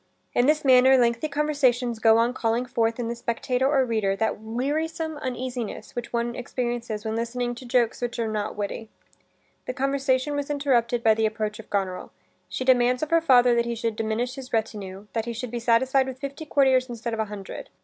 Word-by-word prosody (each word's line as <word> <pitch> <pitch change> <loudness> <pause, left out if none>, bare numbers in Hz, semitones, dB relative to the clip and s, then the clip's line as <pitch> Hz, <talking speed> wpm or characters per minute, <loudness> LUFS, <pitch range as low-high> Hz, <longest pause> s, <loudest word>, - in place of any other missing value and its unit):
In 245 - +3
this 305 0 +2
manner 260 0 +7
lengthy 235 +3 +2
conversations 270 -5 +1
go 225 0 +5
on 235 +2 +2
calling 235 0 0
forth 230 -2 0
in 235 - -2
the 235 - -2
spectator 250 +2 -1
or 275 -3 +3
reader 215 -5 0
that 220 +1 -1
wearisome 300 +8 -2
uneasiness 250 -3 -5
which 240 -1 -5
one 235 0 -1
experiences 240 -3 -4
when 220 0 -2
listening 240 +1 -2
to 245 +1 -10
jokes 240 -1 +1
which 240 0 -3
are 230 -1 -1
not 215 -1 -3
witty. 210 +2 -4 0.8
This 255 - -3
conversation 275 +1 0
was 285 0 -3
interrupted 245 -5 +1
by 220 - +6
the 220 0 +1
approach 215 -1 -3
of 220 - -11
Goneril. 190 -2 -2 0.4
She 255 - -3
demands 250 +1 +3
of 310 - -4
her 330 0 +4
father 250 -6 +5
that 235 0 +2
he 235 0 -2
should 230 -1 -2
diminish 225 +3 -2
his 265 -1 -9
retinue; 205 -3 -3
that 225 -1 -1
he 235 - -4
should 240 0 -5
be 240 - -3
satisfied 260 +3 +3
with 260 -1 -6
fifty 280 +3 -7
courtiers 265 -3 +3
instead 235 0 -4
of 225 - -3
a 220 - +1
hundred. 210 - -8
240 Hz, 200 wpm, -25 LUFS, 225-260 Hz, 0.8 s, manner